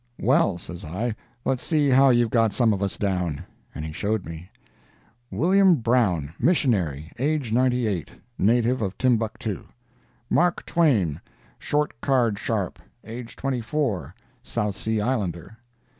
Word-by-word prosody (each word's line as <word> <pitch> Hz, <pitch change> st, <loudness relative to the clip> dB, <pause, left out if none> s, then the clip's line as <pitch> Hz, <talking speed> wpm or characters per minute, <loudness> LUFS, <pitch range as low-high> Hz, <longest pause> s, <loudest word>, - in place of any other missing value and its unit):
'Well,' 95 Hz, -, +3 dB
says 85 Hz, +1 st, -9 dB
I, 105 Hz, +8 st, -3 dB, 0.3 s
'let's 130 Hz, -2 st, 0 dB
see 150 Hz, -3 st, +2 dB
how 135 Hz, +1 st, +6 dB
you've 120 Hz, -2 st, +3 dB
got 115 Hz, -3 st, +3 dB
some 115 Hz, -2 st, +3 dB
of 100 Hz, -, -3 dB
us 100 Hz, -1 st, -1 dB
down.' 90 Hz, -7 st, -1 dB, 0.3 s
And 75 Hz, -, -5 dB
he 80 Hz, -, -6 dB
showed 105 Hz, +3 st, -1 dB
me: 85 Hz, +2 st, -9 dB, 0.8 s
"'Wm. 180 Hz, -, +4 dB
Brown.—Missionary—age, 115 Hz, -, 0 dB
98—native 120 Hz, -, 0 dB
of 95 Hz, -2 st, -3 dB
Timbuctoo. 110 Hz, -4 st, 0 dB, 0.6 s
"'Mark 175 Hz, +5 st, +1 dB
Twain—Short 135 Hz, -, -1 dB
card 120 Hz, -7 st, +2 dB
sharp—age, 115 Hz, +3 st, -5 dB
24—South 115 Hz, -, -3 dB
Sea 110 Hz, 0 st, -1 dB
Islander. 105 Hz, -5 st, -2 dB
110 Hz, 105 wpm, -24 LUFS, 95-130 Hz, 0.8 s, how